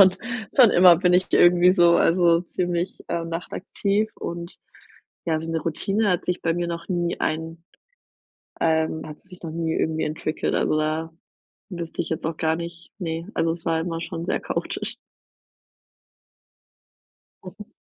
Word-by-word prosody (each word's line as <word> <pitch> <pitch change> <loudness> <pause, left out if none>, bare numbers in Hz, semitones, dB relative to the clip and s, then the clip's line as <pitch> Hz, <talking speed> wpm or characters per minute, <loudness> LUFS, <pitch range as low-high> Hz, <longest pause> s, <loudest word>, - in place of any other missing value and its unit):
schon 190 -1 +7 0.4
schon 245 -5 +8
immer 175 -1 +7
bin 180 0 +2
ich 185 - +3
irgendwie 175 +1 +6
so 175 -2 +5
also 170 -1 +4
ziemlich, 175 0 -2
äh, 170 -1 -2
nachtaktiv 195 +5 -2
und, 170 +1 -6 0.7
ja, 160 -1 +1
so 165 - -5
'ne 165 -1 -1
Routine 200 +6 0
hat 180 - 0
sich 180 - -2
bei 165 0 +1
mir 175 0 -1
noch 170 0 -5
nie 175 -1 -1
ein 160 +1 -3 1.0
ähm, 160 -1 +1
hat 150 -1 -9
sich 180 -1 -14
noch 160 - -5
nie 165 0 -2
irgendwie 160 0 0
entwickelt, 155 +1 -2
also 155 - +1
da 155 +1 -1 0.6
wüsste 170 -3 -4
ich - - -6
jetzt 160 - -3
auch 160 0 -3
gar 160 0 +1
nicht 170 0 -8
ne, 165 0 -4
also 165 0 +1
es 165 +1 -7
war 165 -1 +1
immer 165 -1 -4
schon 170 -2 -5
sehr - - 0
chaotisch. - - -4 2.5
Mhm. 205 +3 -11
170 Hz, 160 wpm, -24 LUFS, 160-180 Hz, 2.5 s, schon